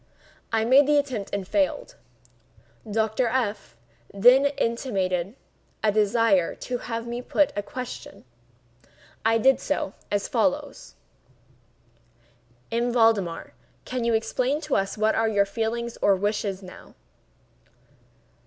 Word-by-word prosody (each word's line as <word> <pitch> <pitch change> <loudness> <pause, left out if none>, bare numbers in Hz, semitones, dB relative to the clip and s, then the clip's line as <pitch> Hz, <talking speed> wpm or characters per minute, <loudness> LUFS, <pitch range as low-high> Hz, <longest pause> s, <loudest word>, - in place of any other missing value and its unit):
I 225 -1 +1
made 265 +4 +6
the 295 0 +4
attempt 255 -8 -2
and 200 -2 -3
failed. 300 - -1 0.9
Dr. 220 +3 0
F—— 225 - -2 0.4
then 250 +7 +5
intimated 205 -8 -2 0.5
a 215 - +3
desire 210 -3 +2
to 245 -1 -4
have 230 -1 -5
me 240 +1 -4
put 290 +3 +1
a 205 - -1
question. 250 - -8 1.0
I 225 0 +3
did 265 +4 +4
so, 250 -9 -2 0.2
as 205 -1 -1
follows: 280 +4 -2 1.8
"M. 235 +1 0
Valdemar, 225 -8 +1 0.3
can 255 -1 -3
you 235 -1 +2
explain 255 +5 0
to 300 -2 -1
us 195 +1 -1
what 215 +1 +2
are 225 0 +1
your 200 -2 +2
feelings 230 +3 -3
or 200 - +4
wishes 200 0 -2
now?" 185 - -13
225 Hz, 120 wpm, -25 LUFS, 205-255 Hz, 1.8 s, made